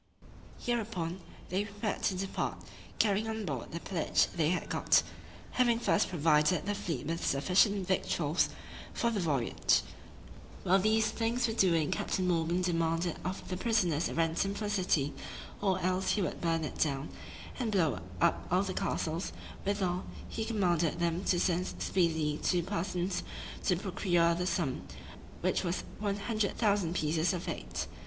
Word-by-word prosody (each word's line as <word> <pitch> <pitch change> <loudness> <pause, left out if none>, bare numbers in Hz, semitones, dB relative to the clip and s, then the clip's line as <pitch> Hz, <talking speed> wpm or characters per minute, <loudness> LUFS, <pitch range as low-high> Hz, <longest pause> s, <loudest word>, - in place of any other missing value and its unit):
Hereupon, 200 -7 -2 0.3
they 190 +3 +1
prepared 205 +1 -3
to 190 - +2
depart, 195 +1 -2 0.4
carrying 210 0 +2
on 220 -1 -3
board 135 -8 -3
all - - -16
the 170 - -4
pillage 170 -2 +1
they 160 -3 +2
had 180 - -1
got, - - +3 0.5
having 240 -2 +3
first 230 -2 +2
provided 160 +1 +3
the 205 - 0
fleet 175 -10 -3
with 165 +2 -2
sufficient 190 +7 +3
victuals 170 -4 +1 0.5
for 235 - +1
the 215 - -1
voyage. 140 -9 +2 0.8
While 190 +2 +4
these 220 +2 +3
things 235 +1 0
were 225 - -1
doing 170 -8 +3
Captain 185 -1 0
Morgan 170 +1 +1
demanded 165 -1 0
of 185 +3 -4
the 185 - -3
prisoners 180 -8 +1
a - - -5
ransom 165 +4 +1
for 215 - -4
the 205 - -1
city, 180 -8 +1 0.5
or 190 -2 +2
else 185 +1 +1
he 205 - +1
would - - -3
burn 165 -1 +1
it 150 - -5
down, 140 -1 0 0.5
and 235 -4 0
blow 165 - +2 0.2
up 85 -1 +2
all 180 +3 +3
the 190 -2 -3
castles; 165 0 -2 0.3
withal, 190 -3 0 0.2
he 220 - -3
commanded 175 -8 +1
them 170 +1 0
to 175 - +2
send 180 0 +1
speedily 160 -4 +1
two 175 -2 +2
persons, 180 0 -2 0.4
to 180 - +4
procure 175 -2 +2
the 180 +2 -1
sum, 155 -8 -1 0.6
which - - +1
was 175 0 -1 0.2
100,000 205 -3 0
pieces 160 +1 +1
of 180 0 -4
eight. - - -3
180 Hz, 155 wpm, -32 LUFS, 165-205 Hz, 0.8 s, While